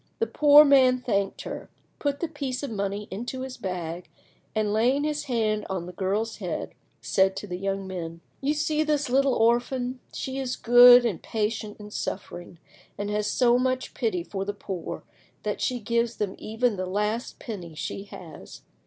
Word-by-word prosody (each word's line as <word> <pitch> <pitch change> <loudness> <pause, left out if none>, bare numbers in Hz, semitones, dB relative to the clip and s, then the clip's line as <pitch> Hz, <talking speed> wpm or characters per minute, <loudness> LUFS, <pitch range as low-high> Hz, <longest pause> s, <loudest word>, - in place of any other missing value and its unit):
The 455 - +1
poor 295 -5 +7
man 260 -3 +6
thanked 200 -5 -1
her, - - -7 0.3
put 285 -1 -1
the 340 - 0
piece 280 -4 -4
of 280 - -3
money 200 0 -3
into 240 +6 -4
his 260 -1 -5
bag, 180 -4 -5 0.5
and, 215 -1 +1
laying 250 +6 +2
his 300 0 -2
hand 220 -4 0
on 185 -3 -3
the 180 - -8
girl's 205 +5 -1
head, - - -4 0.3
said 190 0 +2
to - - -5
the 180 -3 -5
young 195 0 -2
men— 170 -3 -6 0.2
"You 285 +2 +1
see 305 0 +1
this 295 -4 0
little 275 0 +3
orphan; 245 +2 +1
she 265 0 -4
is 255 -2 -2
good 245 +1 +8
and 205 -8 -1
patient 215 -1 -3
in 210 0 -10
suffering, 175 -4 -5 0.4
and 205 0 -3
has 210 0 0
so 245 -1 +3
much 255 0 -1
pity 220 -9 -1
for 195 +2 -4
the 205 +1 -4
poor 190 -4 -6 0.4
that - - -2
she 250 -2 0
gives 235 +1 0
them 200 -2 -2
even 225 0 0
the 185 0 -3
last 210 +5 -2
penny 180 -8 -7
she 195 +6 -5
has. 175 -4 -11
225 Hz, 180 wpm, -26 LUFS, 195-255 Hz, 0.5 s, good